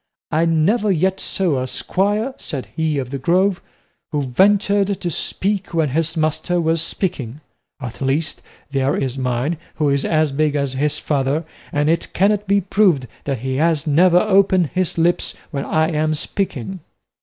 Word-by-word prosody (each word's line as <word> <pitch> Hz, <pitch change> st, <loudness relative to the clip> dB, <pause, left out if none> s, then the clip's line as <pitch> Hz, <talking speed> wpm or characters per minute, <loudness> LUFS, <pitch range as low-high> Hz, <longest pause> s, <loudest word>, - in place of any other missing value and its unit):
"I 160 Hz, +2 st, +2 dB
never 195 Hz, +7 st, +2 dB
yet 190 Hz, +2 st, +1 dB
saw 165 Hz, -9 st, 0 dB
a 130 Hz, -, -3 dB
squire," 205 Hz, -, -1 dB
said 135 Hz, -5 st, -6 dB
he 160 Hz, -2 st, 0 dB
of 130 Hz, -2 st, -3 dB
the 140 Hz, -, -3 dB
Grove, 180 Hz, +6 st, +2 dB, 0.5 s
"who 150 Hz, -2 st, 0 dB
ventured 200 Hz, -, +2 dB
to 175 Hz, -, -2 dB
speak 195 Hz, +3 st, -2 dB
when 160 Hz, -3 st, +2 dB
his 165 Hz, +4 st, -1 dB
master 160 Hz, +3 st, 0 dB
was 165 Hz, -1 st, +1 dB
speaking; 150 Hz, -, -3 dB, 0.4 s
at 125 Hz, -2 st, -7 dB
least, 145 Hz, +4 st, 0 dB, 0.3 s
there 135 Hz, 0 st, +1 dB
is 130 Hz, -2 st, -2 dB
mine, 130 Hz, +4 st, -1 dB, 0.2 s
who 150 Hz, -2 st, +1 dB
is 140 Hz, -1 st, +1 dB
as 155 Hz, -2 st, +1 dB
big 150 Hz, +1 st, +1 dB
as 140 Hz, -2 st, -1 dB
his 150 Hz, +3 st, 0 dB
father, 145 Hz, +2 st, -1 dB, 0.3 s
and 145 Hz, 0 st, +1 dB
it 165 Hz, +1 st, 0 dB
cannot 205 Hz, +2 st, +2 dB
be 200 Hz, +1 st, +3 dB
proved 185 Hz, -7 st, +2 dB, 0.2 s
that 135 Hz, -5 st, -2 dB
he 130 Hz, 0 st, -2 dB
has 160 Hz, 0 st, +1 dB
ever 175 Hz, +4 st, +5 dB
opened 190 Hz, -4 st, +3 dB
his 185 Hz, -2 st, 0 dB
lips 170 Hz, +1 st, +1 dB, 0.2 s
when 140 Hz, -3 st, -3 dB
I 160 Hz, 0 st, +1 dB
am 155 Hz, 0 st, 0 dB
speaking." 185 Hz, -, -3 dB
160 Hz, 165 wpm, -20 LUFS, 140-185 Hz, 0.5 s, ever